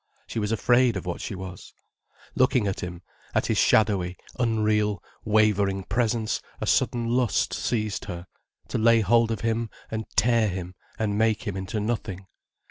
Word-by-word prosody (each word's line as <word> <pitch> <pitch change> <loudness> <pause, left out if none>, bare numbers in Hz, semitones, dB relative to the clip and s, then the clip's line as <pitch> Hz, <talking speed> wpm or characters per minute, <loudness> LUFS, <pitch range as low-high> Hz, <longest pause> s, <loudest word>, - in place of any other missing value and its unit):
She - - -4
was 105 0 -1
afraid 120 0 +3
of 95 - -6
what 90 - -4
she 105 - -4
was. 95 -1 -9 0.6
Looking 130 -3 +3
at 95 -1 -2
him, 90 0 -6 0.3
at - - +2
his - - +1
shadowy, 95 -5 +3 0.2
unreal, 105 -4 +1 0.2
wavering 105 -3 +2
presence 115 0 0 0.2
a - - -2
sudden 120 -1 +1
lust 120 -1 +1
seized 105 -4 -1
her, 85 0 -6 0.4
to - - -1
lay 115 0 +5
hold 115 +3 +4
of 110 -3 -2
him 115 0 0 0.2
and 110 0 -3
tear 115 -2 +4
him 90 -2 -4 0.2
and 105 -1 -1
make 110 0 +2
him 105 -4 -3
into 95 +3 -3
nothing. 105 -3 -3
110 Hz, 160 wpm, -26 LUFS, 95-115 Hz, 0.6 s, lay